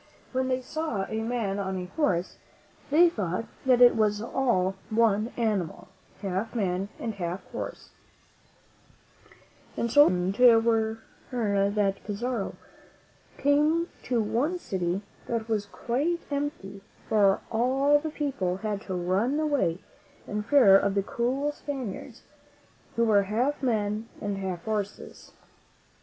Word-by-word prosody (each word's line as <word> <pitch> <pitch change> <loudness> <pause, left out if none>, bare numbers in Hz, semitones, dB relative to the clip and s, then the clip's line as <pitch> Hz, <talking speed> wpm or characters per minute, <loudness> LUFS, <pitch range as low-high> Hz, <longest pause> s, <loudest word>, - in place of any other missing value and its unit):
When 260 0 0
they 255 0 0
saw 255 -7 -3
a 220 0 -3
man 225 -4 -2
on 190 -1 -2
a 180 - -4
horse, 185 - 0 0.5
they 325 +5 +6
thought 205 - -2 0.2
that 250 -1 +5
it 245 - +8
was 210 -2 +2
all 230 -5 +1 0.2
one 220 0 +2
animal, 210 -10 -1 0.3
half 195 +5 -2
man 195 -2 -1
and 225 - -3
half 180 -1 -4
horse; - - -6 1.9
and 235 - -1
so 290 +3 +8
frightened 225 +6 +4
were 225 -1 +1 0.3
they, 200 -5 +1
that 195 -2 0
Pizarro 225 +1 -3 0.8
came 300 +4 +2 0.2
to 245 -2 +1
one 270 +12 0
city 185 - -2 0.2
that 230 -2 -2
was 210 -3 -1
quite 290 +12 -1
empty, 280 -9 -4 0.3
for 200 -3 +3
all 265 +5 +3
the 315 +1 -4
people 260 - -2
had 205 -1 -3
run 190 +10 0
away 285 - +1 0.5
in 210 0 -3
fear 215 -4 +6
of 200 0 0
the 200 - +2
cruel 260 +7 -1
Spaniards 270 -8 -6 0.7
who 235 - +2
were 210 -3 +5
half 250 +7 0
men 220 -3 -1
and 200 -1 -3
half 185 -3 -4
horses. 210 -2 -5
220 Hz, 130 wpm, -27 LUFS, 195-260 Hz, 1.9 s, it